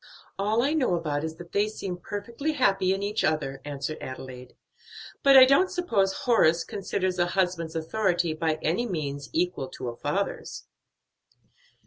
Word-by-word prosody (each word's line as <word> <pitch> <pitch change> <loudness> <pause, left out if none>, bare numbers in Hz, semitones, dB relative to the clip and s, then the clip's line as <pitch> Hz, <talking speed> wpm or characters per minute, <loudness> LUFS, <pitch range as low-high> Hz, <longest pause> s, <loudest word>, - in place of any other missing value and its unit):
"All 215 +4 +2
I 285 +3 +1
know 260 - +2
about 150 -4 -2
it - - -3
is 160 - -8
that 170 +1 -12
they 205 +1 +2
seem 195 -4 -5
perfectly 230 - -4
happy 195 -9 +2
in 195 +1 -1
each 205 +2 -1
other," 135 -3 -1
answered 145 +1 -5
Adelaide; 130 -1 -8 0.7
"but 275 -1 +7
I 260 - +11
don't 275 +8 +4
suppose 220 - 0
Horace 175 - +3
considers 185 -2 -2
a 175 - +3
husband's 175 -3 -1
authority 175 0 0
by 160 -1 -1
any 185 +10 0
means 145 - -4
equal 170 -5 -1
to 125 -1 -6
a 120 - -7
father's." 190 +11 -3
180 Hz, 160 wpm, -26 LUFS, 155-215 Hz, 0.7 s, I